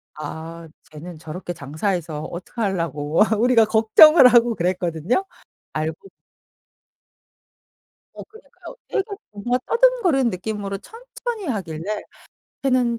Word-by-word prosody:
'아 160 +2 -8 0.2
쟤는 160 +2 -10
저렇게 175 +3 -7
장사해서 155 +1 -3
어떻게 175 +8 -8
하려고' 165 -6 -1 0.2
우리가 235 -1 +4
걱정을 225 +8 +7
하고 240 -2 +4
그랬거든요. 180 - -1 0.5
알고 155 +1 -2
보 195 - -16 2.1
어 - - -8
그니까요. 445 +2 -14
되게 390 - -1 0.3
뭔가 225 +5 -1
더듬거리는 465 - +3
느낌으로 200 +1 -4
천천히 465 - -7
하길래 195 - -4 0.6
"쟤는 250 -3 +1
200 Hz, 270 characters per minute, -22 LUFS, 165-250 Hz, 2.1 s, 걱정을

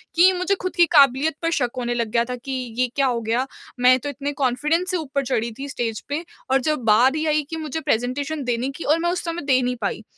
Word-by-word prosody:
कि 360 +3 +7
मुझे 365 +2 0
खुद 370 - -3
की 345 - +6
काबिलियत 280 +2 +5
पर 330 0 0
शक 245 -2 +1
होने 240 -1 -1
लग 235 -2 -1
गया 235 -1 +3
था 250 - -2
कि 250 +3 -8 0.3
ये 255 0 +2
क्या 275 -1 +2
हो 240 -2 -1
गया 230 +3 0 0.3
मैं 250 +1 +6
तो 290 - -5
इतने 285 +1 -4
कॉन्फिडेंस 300 +9 +1
से 365 - 0
ऊपर 280 -3 -3
चढ़ी 235 -2 -1
थी 280 +1 -5
स्टेज 230 -4 -3
पे, 295 +4 -2 0.3
और 270 0 +4
जब 305 -2 -1
बारी 255 +8 +4
ही 315 - -1
आई 305 -1 +2
कि 325 - -4
मुझे 315 -1 -4
प्रेजेंटेशन 280 +3 -1
देने 245 +1 -1
की - - -6
और 310 +3 +2
मैं 345 - 0
उस 360 - -3
समय 335 0 -3
दे 260 -2 +3
नहीं 250 0 -1
पाई। 205 +2 -2
275 Hz, 255 wpm, -22 LUFS, 245-315 Hz, 0.3 s, कि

